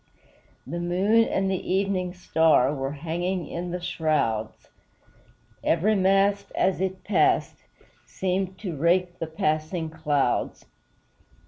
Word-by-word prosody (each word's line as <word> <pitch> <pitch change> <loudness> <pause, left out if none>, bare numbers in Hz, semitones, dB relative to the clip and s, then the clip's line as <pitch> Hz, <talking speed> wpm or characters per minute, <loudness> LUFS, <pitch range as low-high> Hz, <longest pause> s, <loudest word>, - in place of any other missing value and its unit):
The 170 - -5
moon 195 +6 +3
and 195 -2 0
the 185 - -3
evening 190 -2 0
star 160 -6 +3
Were 135 -1 -3
hanging 170 +3 -3
in 175 +1 -5
the 180 +1 -3
shrouds; 145 -11 -1 0.9
Every 185 +7 +2
mast, 195 +1 +2
as 190 -1 +1
it 190 0 -3
passed, 205 - +2 0.5
Seemed 185 0 -2
to 180 -7 -4
rake 175 +4 +1
the 165 - -3
passing 160 +1 -2
clouds. 150 -5 -1
175 Hz, 115 wpm, -25 LUFS, 160-190 Hz, 0.9 s, moon